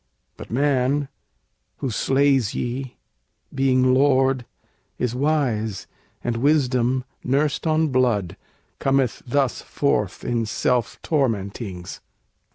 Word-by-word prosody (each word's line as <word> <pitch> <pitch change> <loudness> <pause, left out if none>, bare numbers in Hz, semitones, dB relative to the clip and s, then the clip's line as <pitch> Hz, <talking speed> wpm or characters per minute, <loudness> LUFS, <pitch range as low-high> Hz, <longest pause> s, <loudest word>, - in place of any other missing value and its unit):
But - - -10
man, 135 +2 +1 0.7
who 130 - -3
slays 135 -1 +2
ye 125 +1 -4 0.6
being 130 -1 +3
lord 135 -2 +3 0.5
is 125 -2 -1
wise, 125 -7 0 0.4
And 120 -1 -1
wisdom, 130 -2 +2 0.2
nursed 140 +4 0
on 155 0 +2
blood, 120 -8 +1 0.4
cometh 135 -3 +1
thus 135 0 +1
forth 105 -9 -1
In 115 -2 0
self 120 +1 0
tormentings!" 100 - -2
130 Hz, 95 wpm, -23 LUFS, 120-140 Hz, 0.7 s, being